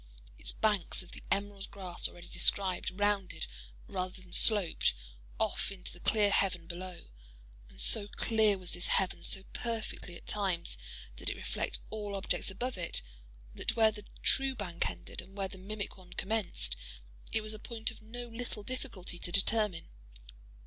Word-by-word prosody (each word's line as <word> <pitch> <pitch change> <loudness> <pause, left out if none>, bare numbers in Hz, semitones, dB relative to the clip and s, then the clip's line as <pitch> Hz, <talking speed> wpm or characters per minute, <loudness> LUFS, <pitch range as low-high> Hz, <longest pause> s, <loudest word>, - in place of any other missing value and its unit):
Its - - +3
banks, 210 -4 +1
of 180 - -13
the - - -9
emerald 200 0 -1
grass 185 -3 -2
already 175 0 -10
described, 185 +1 +3
rounded, 205 -2 +1 0.4
rather 185 +1 -3
than 185 -1 -11
sloped, 200 - +6 0.4
off - - +1
into 190 -2 -6
the 175 - -12
clear 210 +1 +3
heaven 185 -4 +2
below; 175 - -7 0.6
and - - -8
so 205 -2 +6
clear 215 -1 +3
was 180 -2 -3
this 175 - 0
heaven, 190 -1 +2
so 195 - +3
perfectly, 225 -6 -3
at - - -11
times, 190 -5 0 0.4
did - - -1
it - - -3
reflect - - -1
all 210 -2 -3
objects 195 +1 0
above 220 +3 -3
it, 170 - -1 0.5
that - - 0
where 220 -1 +6
the 210 -1 -10 0.2
true 270 0 +4
bank 175 - -1
ended 85 -1 -6
and 195 +2 -15
where 195 -1 0
the 190 0 -9
mimic 200 +1 -5
one 180 -1 -13
commenced, 190 - 0 0.6
it 220 - +3
was 215 0 -3
a 215 - -6
point 225 0 -3
of - - -15
no 240 +3 -7
little 230 -2 -5
difficulty 210 -8 -5
to 175 - 0
determine. 200 -2 +5
195 Hz, 165 wpm, -33 LUFS, 180-215 Hz, 0.6 s, sloped